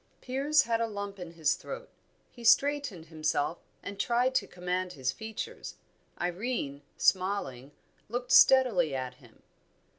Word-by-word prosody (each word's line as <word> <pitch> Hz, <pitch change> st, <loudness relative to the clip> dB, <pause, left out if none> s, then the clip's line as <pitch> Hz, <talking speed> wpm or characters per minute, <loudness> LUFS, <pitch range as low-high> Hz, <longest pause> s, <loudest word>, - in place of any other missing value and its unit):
Piers 275 Hz, +3 st, +2 dB
had 230 Hz, -2 st, 0 dB
a 230 Hz, -, +1 dB
lump 200 Hz, -2 st, -6 dB
in 175 Hz, -2 st, -8 dB
his 160 Hz, -3 st, +2 dB
throat; -, -, -7 dB, 0.4 s
he 240 Hz, -, -13 dB
straightened 275 Hz, -, +3 dB
himself, 155 Hz, 0 st, -1 dB, 0.2 s
and 200 Hz, 0 st, -7 dB
tried 245 Hz, +3 st, +2 dB
to 260 Hz, -, +1 dB
command 180 Hz, 0 st, -3 dB
his 135 Hz, -3 st, -1 dB
features. 220 Hz, +7 st, -7 dB, 0.4 s
Irene, 175 Hz, -, -2 dB, 0.2 s
smiling, 180 Hz, -9 st, 0 dB, 0.4 s
looked 245 Hz, +2 st, -3 dB
steadily 215 Hz, -, +6 dB
at 130 Hz, -1 st, -3 dB
him. 120 Hz, -3 st, -20 dB
195 Hz, 130 wpm, -30 LUFS, 160-240 Hz, 0.4 s, steadily